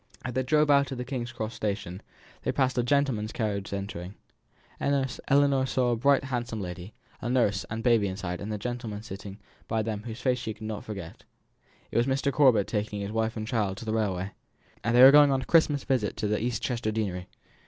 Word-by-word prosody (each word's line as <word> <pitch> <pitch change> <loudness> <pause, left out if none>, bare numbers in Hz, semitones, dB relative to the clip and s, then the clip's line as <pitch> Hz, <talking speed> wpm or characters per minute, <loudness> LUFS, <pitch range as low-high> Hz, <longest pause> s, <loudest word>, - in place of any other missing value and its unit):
As 125 - -3
they 130 - +1
drove 150 +3 +3
out 140 -1 +4
of 135 - -4
the 125 - -4
King's 120 -2 -4
Cross 110 -1 -4
station, 100 -3 -3 0.4
they - - 0
passed 130 -2 +1
a 125 - +2
gentleman's 125 -5 +1
carriage 105 -4 -2
entering. 100 -1 -5 0.7
Ellinor 140 0 +2
saw 125 -2 +1
a - - +2
bright, 140 +4 +3
handsome 120 -4 -3
lady, 90 +1 -7 0.3
a 120 - -3
nurse, 115 -6 +2
and 110 +1 -4
baby 115 -4 +4
inside, 95 -2 -4
and 105 +2 -4
a 105 - -2
gentleman 110 -1 -5
sitting 100 -1 -8 0.3
by 110 -1 0
them 105 -1 -3
whose 115 0 -6
face 130 -1 +1
she 110 -3 -4
could 110 - -9
never 110 -1 -4
forget. 100 -6 -8 0.7
It - - -1
was 120 +2 +3
Mr. 135 +1 0
Corbet 125 -9 +5
taking 105 -1 -3
his 100 +1 -4
wife 110 +1 -1
and 110 - -3
child 105 -5 -1
to 115 - -8
the 110 - -1
railway. 100 -3 -1 0.5
They 120 +2 +5
were 135 - +11
going 145 0 +7
on 135 -1 +1
a - - -9
Christmas 150 -4 +3
visit 120 -7 0
to 105 0 0
East 120 -1 -2
Chester 120 -3 -1
deanery. 95 -5 -3
115 Hz, 205 wpm, -28 LUFS, 105-130 Hz, 0.7 s, were